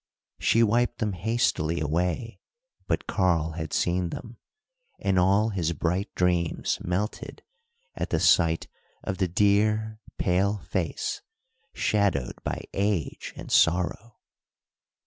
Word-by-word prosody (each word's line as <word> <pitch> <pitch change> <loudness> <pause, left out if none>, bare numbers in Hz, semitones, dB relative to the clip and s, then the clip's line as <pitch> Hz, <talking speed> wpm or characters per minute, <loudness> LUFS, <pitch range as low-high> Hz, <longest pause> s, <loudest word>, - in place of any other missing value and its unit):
She 115 - +4
wiped 120 +2 +2
them 105 -3 -1
hastily 90 -5 0
away, 85 +9 -1 0.5
but - - 0
Karl 85 -5 +1
had 80 -1 -5
seen 90 0 +1
them, 115 +6 -8 0.6
and 95 -2 +1
all 100 +4 +3
his 85 -5 -1
bright 90 +6 -1
dreams 90 -2 +1
melted 95 +5 -3 0.5
at - - -4
the - - +1
sight 80 -2 +3 0.4
of 95 - -3
the 95 - +2
dear, 105 +3 +2 0.2
pale 100 +3 +1
face, - - -3 0.5
shadowed 100 - 0
by - - -3
age 100 -5 -1
and - - -9
sorrow. 90 +6 +2
95 Hz, 115 wpm, -26 LUFS, 85-105 Hz, 0.6 s, She